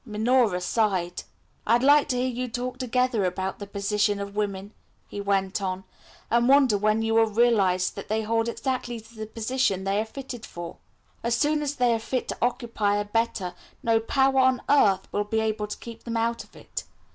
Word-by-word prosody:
Minora 220 Hz, -3 st, +2 dB
sighed. 185 Hz, -3 st, 0 dB, 0.5 s
"I 230 Hz, -, +5 dB
like 285 Hz, +4 st, +5 dB
to 250 Hz, -, 0 dB
hear 250 Hz, -, +1 dB
you 250 Hz, 0 st, -3 dB
talk 245 Hz, +2 st, -4 dB
together 250 Hz, -3 st, +1 dB
about 190 Hz, +1 st, -2 dB
the 205 Hz, -, -7 dB
position 205 Hz, +1 st, 0 dB
of 200 Hz, 0 st, -6 dB
women," 200 Hz, -1 st, -3 dB, 0.3 s
he 205 Hz, -, -6 dB
went 195 Hz, 0 st, 0 dB
on, 190 Hz, -1 st, -3 dB, 0.5 s
"and 235 Hz, +2 st, +3 dB
wonder 270 Hz, -5 st, +5 dB
when 215 Hz, +2 st, +1 dB
you 225 Hz, 0 st, 0 dB
will 225 Hz, 0 st, +5 dB
realise 205 Hz, -5 st, +2 dB
that 200 Hz, -, -8 dB
they 220 Hz, +1 st, 0 dB
hold 225 Hz, +1 st, 0 dB
exactly 250 Hz, -1 st, -3 dB
the 220 Hz, -1 st, -9 dB
position 220 Hz, -3 st, -1 dB
they 195 Hz, +2 st, +1 dB
are -, -, -3 dB
fitted 245 Hz, 0 st, -8 dB
for. 170 Hz, -4 st, -8 dB, 0.4 s
As 235 Hz, 0 st, +1 dB
soon 300 Hz, +2 st, +2 dB
as 290 Hz, -1 st, -2 dB
they 245 Hz, -3 st, +3 dB
are 225 Hz, -, 0 dB
fit 250 Hz, +3 st, -3 dB
to -, -, -3 dB
occupy 235 Hz, -4 st, 0 dB
a 205 Hz, 0 st, -1 dB
better, 210 Hz, -4 st, -1 dB, 0.3 s
no 225 Hz, -1 st, +3 dB
power 265 Hz, +3 st, +2 dB
on 260 Hz, -1 st, +3 dB
earth 200 Hz, -10 st, +4 dB
will 205 Hz, -, 0 dB
be 220 Hz, +2 st, -1 dB
able 215 Hz, -1 st, -1 dB
to 210 Hz, -, -6 dB
keep 230 Hz, -1 st, -10 dB
them 230 Hz, -1 st, -3 dB
out 230 Hz, +1 st, -1 dB
of -, -, -23 dB
it. -, -, -7 dB
225 Hz, 195 wpm, -26 LUFS, 205-245 Hz, 0.5 s, I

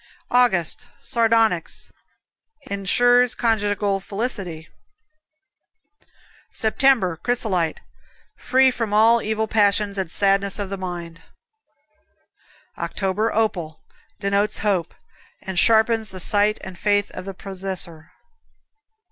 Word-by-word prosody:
August, 245 Hz, -2 st, +2 dB
Sardonyx 225 Hz, -6 st, 0 dB, 0.8 s
Insures 245 Hz, +5 st, +3 dB
conjugal 205 Hz, -3 st, 0 dB
felicity. 195 Hz, -6 st, -5 dB, 1.8 s
September, 220 Hz, -6 st, +2 dB
Chrysolite 190 Hz, -8 st, -1 dB, 0.5 s
Free 260 Hz, 0 st, +3 dB
from 225 Hz, -4 st, -3 dB
all 230 Hz, +2 st, +5 dB
evil 220 Hz, +1 st, -2 dB
passions 205 Hz, -1 st, +1 dB
and 185 Hz, -3 st, -2 dB
sadness 195 Hz, +2 st, +1 dB
of 200 Hz, -2 st, -5 dB
the -, -, -2 dB
mind. 175 Hz, -2 st, -7 dB, 1.6 s
October, 205 Hz, +3 st, -1 dB
Opal 190 Hz, -8 st, -2 dB, 0.4 s
Denotes 200 Hz, +1 st, 0 dB
hope, 190 Hz, -6 st, -1 dB, 0.5 s
and 190 Hz, -2 st, -1 dB
sharpens 220 Hz, +1 st, +3 dB
the 185 Hz, -, -5 dB
sight 205 Hz, +3 st, +2 dB
and 190 Hz, -3 st, -9 dB
faith 205 Hz, -1 st, +1 dB
of -, -, -8 dB
the 195 Hz, -1 st, -7 dB
possessor. 185 Hz, -5 st, -5 dB
205 Hz, 95 wpm, -22 LUFS, 185-225 Hz, 1.8 s, all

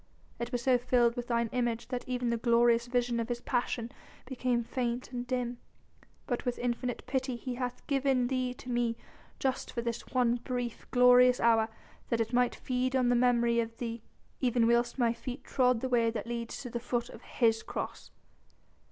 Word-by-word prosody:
It 235 Hz, -, -4 dB
was 245 Hz, -1 st, -2 dB
so 255 Hz, -1 st, +4 dB
filled 240 Hz, -1 st, +3 dB
with 240 Hz, 0 st, -4 dB
thine 235 Hz, -1 st, +1 dB
image 240 Hz, -2 st, -1 dB
that 250 Hz, -1 st, -4 dB
even 250 Hz, -1 st, 0 dB
the 235 Hz, -, +1 dB
glorious 235 Hz, 0 st, +3 dB
vision 240 Hz, -1 st, 0 dB
of 230 Hz, +1 st, -2 dB
His 240 Hz, 0 st, -2 dB
Passion 240 Hz, -1 st, -2 dB, 0.3 s
became 250 Hz, -2 st, -1 dB
faint 240 Hz, +1 st, -3 dB
and 245 Hz, -1 st, -4 dB
dim. 245 Hz, -1 st, -2 dB, 0.7 s
But 245 Hz, -3 st, -2 dB
with 245 Hz, -1 st, -2 dB
infinite 245 Hz, 0 st, -2 dB
pity 260 Hz, 0 st, -1 dB
He 250 Hz, +1 st, -5 dB
hath 250 Hz, 0 st, -4 dB
given 270 Hz, -3 st, +2 dB
thee 255 Hz, 0 st, -1 dB
to 250 Hz, -, -11 dB
me 240 Hz, -1 st, 0 dB, 0.4 s
just 265 Hz, -1 st, -2 dB
for 235 Hz, -, -3 dB
this 235 Hz, 0 st, -4 dB
one 245 Hz, -2 st, +2 dB
brief, 245 Hz, -1 st, -4 dB
glorious 250 Hz, 0 st, +6 dB
hour 225 Hz, -1 st, +4 dB, 0.4 s
that 230 Hz, -, +1 dB
it 225 Hz, +1 st, -1 dB
might 245 Hz, 0 st, +3 dB
feed 255 Hz, +1 st, -1 dB
on 250 Hz, -2 st, +3 dB
the 245 Hz, -, +4 dB
memory 235 Hz, -1 st, +3 dB
of 230 Hz, 0 st, -3 dB
thee, 230 Hz, -1 st, -4 dB, 0.4 s
even 245 Hz, -2 st, +2 dB
whilst 235 Hz, +2 st, +2 dB
my 235 Hz, -3 st, +2 dB
feet 250 Hz, +3 st, -7 dB
trod 250 Hz, -3 st, +2 dB
the 260 Hz, -, -1 dB
way 235 Hz, -2 st, +3 dB
that 225 Hz, -1 st, -4 dB
leads 235 Hz, 0 st, -4 dB
to 245 Hz, -, -7 dB
the 235 Hz, -, -2 dB
foot 240 Hz, 0 st, -2 dB
of -, -, -11 dB
His 225 Hz, -2 st, +1 dB
Cross." -, -, -6 dB
245 Hz, 190 wpm, -31 LUFS, 235-250 Hz, 0.7 s, glorious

